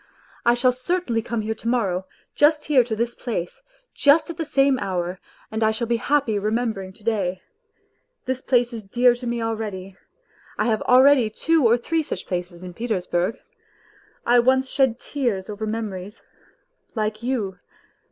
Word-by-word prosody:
I 240 - +6
shall 250 +1 +3
cer 255 +9 -1
tainly 230 -10 -2
come 230 0 -2
here 220 +1 -2
to 220 - -8
morrow, 195 -7 0 0.3
just 300 0 +3
here 275 -5 +4
to 225 -2 -3
this 235 +2 -1
place, 210 - -5 0.3
just 305 +4 +4
at 335 - -10
the 325 - -2
same 275 -2 +2
hour, 180 -1 -3 0.3
and 220 +1 -1
I 220 - +4
shall 220 +2 -1
be 235 0 +1
happy 265 -5 +1
remembering 215 -2 -2
to 210 - -20
day. 190 -5 -1 0.8
This 260 0 -2
place 245 -2 +2
is 225 -2 -6
dear 240 +5 +3
to 245 0 -7
me 235 -1 -1
already. 210 -4 -4 0.6
I 210 - +1
h - - +1
J - - -5
a - - +1
L 250 - +8
e_aIiady 260 -6 +4
two 325 -6 +3
&r 235 +2 +4
three 325 +7 -1
such 195 -10 -5
places 180 -1 -5
in 180 -1 -8
Petersburg. 185 -2 -1 0.9
I 240 +1 +5
once 260 +2 +2
shed 265 -4 +2
tears 230 -9 -2
over 215 +1 -4
memories... 210 -2 -5 0.7
like 215 0 -2
you. 220 -7 -2
230 Hz, 180 wpm, -23 LUFS, 205-255 Hz, 0.9 s, L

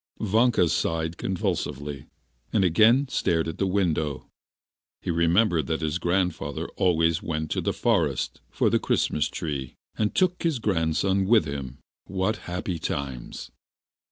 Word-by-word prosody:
Vanka 110 -2 +3
sighed 80 0 -1
convulsively, 75 -8 -3 0.4
and 105 - +2
again 110 - +5
stared 80 -9 0
at 80 +2 -5
the 95 - +1
window. 80 -7 0 0.8
He - - -1
remembered 85 +1 +2
that 80 0 -1
his 80 +2 -1
grandfather 85 -5 -1
always 85 -2 +2
went 80 -1 -3
to - - 0
the - - 0
forest - - 0
for - - +1
the - - +3
Christmas 75 -2 +1
tree, 70 -5 -4 0.2
and 105 -1 -1
took 180 -1 +2
his 165 -5 +1
grandson 95 -1 +1
with 110 -6 +5
him. 70 -2 -5 0.3
What 95 +3 -1
happy 90 -1 -3
times! 70 -5 -5
85 Hz, 135 wpm, -26 LUFS, 80-100 Hz, 0.8 s, again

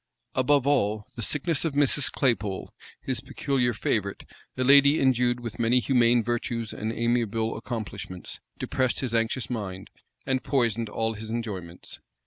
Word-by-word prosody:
Above 135 +1 +3
all, 110 -7 +2
the 115 - -5
sickness 150 - 0
of 165 -4 -1
Mrs. 145 -1 +3
Claypole, 105 -7 -1 0.3
his - - -2
peculiar 130 -4 0
favorite, 105 -2 -2 0.3
a 130 - +1
lady 140 +3 +7
endued 125 -2 +2
with 115 -2 -7
many 120 +2 +4
humane 120 -2 +3
virtues 120 -1 -2
and 110 +1 -3
amiable 115 -1 0
accomplishments, 110 -5 -6 0.2
depressed 130 -1 0
his 125 -3 -2
anxious 115 +2 0
mind, 95 -6 -5 0.3
and 130 -1 0
poisoned 115 -5 +1
all 115 +1 -1
his 110 0 -8
enjoyments. 100 -7 -5
120 Hz, 140 wpm, -26 LUFS, 110-130 Hz, 0.3 s, lady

